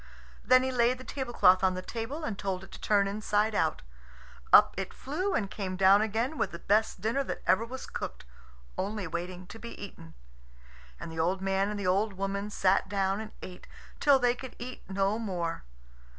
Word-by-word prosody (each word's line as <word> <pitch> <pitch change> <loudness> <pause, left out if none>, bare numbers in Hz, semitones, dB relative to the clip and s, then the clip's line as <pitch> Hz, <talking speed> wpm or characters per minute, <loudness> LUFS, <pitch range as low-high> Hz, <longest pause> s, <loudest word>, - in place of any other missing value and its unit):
Then 255 0 +5
he 260 - 0
laid 245 0 +2
the 255 - -10
tablecloth 240 -10 +3
on 185 -1 +3
the 185 - -5
table 240 - -5
and 260 -9 -2
told 190 -1 -3
it - - -13
to - - -11
turn 200 -2 +3
inside 210 +1 0
out. 160 -6 0 0.7
Up - - +8
it 195 0 -5
flew, 365 +9 -2
and 200 - 0
came 190 -3 -4
down 195 +2 +6
again 225 +7 -1
with - - +1
the 170 - -7
best 215 +5 +1
dinner 230 +6 0
that - - -5
ever 190 +5 +3
was 255 +2 -7
cooked, - - -6 0.5
only 205 +1 -2
waiting 175 +2 -5
to 225 +4 -11
be 235 +1 -9
eaten. 165 -5 -10 0.8
And - - -7
the 160 - -6
old 180 +4 +1
man 195 +1 0
and 210 -1 -4
the 200 - -3
old 195 +3 +2
woman 195 +1 -3
sat 195 -1 +2
down 195 +1 0
and 215 -1 -8
ate 180 -1 -10 0.3
till 285 -2 +6
they 245 -2 +3
could 255 0 -9
eat 250 +1 -7
no 195 +3 0
more. 175 - -3
200 Hz, 195 wpm, -29 LUFS, 190-235 Hz, 0.8 s, Up